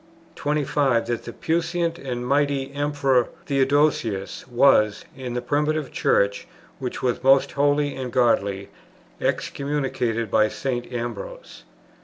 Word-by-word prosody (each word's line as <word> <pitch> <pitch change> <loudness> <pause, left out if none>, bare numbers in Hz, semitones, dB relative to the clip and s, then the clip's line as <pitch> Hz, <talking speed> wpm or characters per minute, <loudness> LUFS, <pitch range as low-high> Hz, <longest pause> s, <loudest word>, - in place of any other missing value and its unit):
25. 145 -4 +1
That 120 -1 -3
the - - -6
puissant 170 +1 -1
and 125 -2 -4
mighty 140 0 +1
Emperor 140 -4 +1 0.2
Theodosius 135 -8 +1
was, 120 -5 +3
in 125 -2 -5
the 125 - -2
Primitive 150 +1 0
Church 100 +7 +1 0.3
which 130 -2 -5
was 125 0 0
most 135 0 +5
holy 145 0 +1
and 130 -2 -5
godly, 100 -6 +1 0.5
excommunicated 130 -6 -1
by 110 0 +4
St. 125 +1 -4
Ambrose. 125 - -6
135 Hz, 115 wpm, -23 LUFS, 120-145 Hz, 0.5 s, most